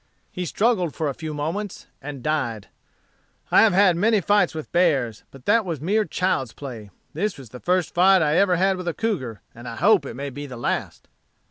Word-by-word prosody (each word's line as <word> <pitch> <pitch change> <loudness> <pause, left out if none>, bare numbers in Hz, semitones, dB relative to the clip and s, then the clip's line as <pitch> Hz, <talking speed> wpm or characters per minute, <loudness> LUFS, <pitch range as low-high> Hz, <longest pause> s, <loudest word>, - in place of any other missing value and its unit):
He 180 - -4
struggled 200 - +1
for 155 -2 -1
a - - -3
few 160 +2 -6
moments 165 +8 -4 0.2
and 140 -2 -7
died. 130 -9 -2 0.8
I - - +7
have 225 - +5
had 190 -2 +5
many 215 +5 +3
fights 205 -3 +2
with 155 - -7
bears, 140 - +1
but 135 -2 -16
that 230 -1 +4
was 170 -6 -4
mere 205 +8 +1
child's 135 - -1
play. 120 -7 -8 0.2
This 200 +6 -2
was 135 -5 -12
the 125 - -9
first 180 0 0
fight 185 0 +5
ever 180 +5 +3
I - - +2
had 190 +1 +2
with 180 -1 -6
a 170 - -1
cougar, 140 - -3
and 120 +1 -11
I 115 - -6
hope 175 - +3
it - - -7
may 140 +2 -5
be 145 +3 -7
the 125 -3 -8
last." 120 - -3
160 Hz, 210 wpm, -23 LUFS, 135-190 Hz, 0.8 s, I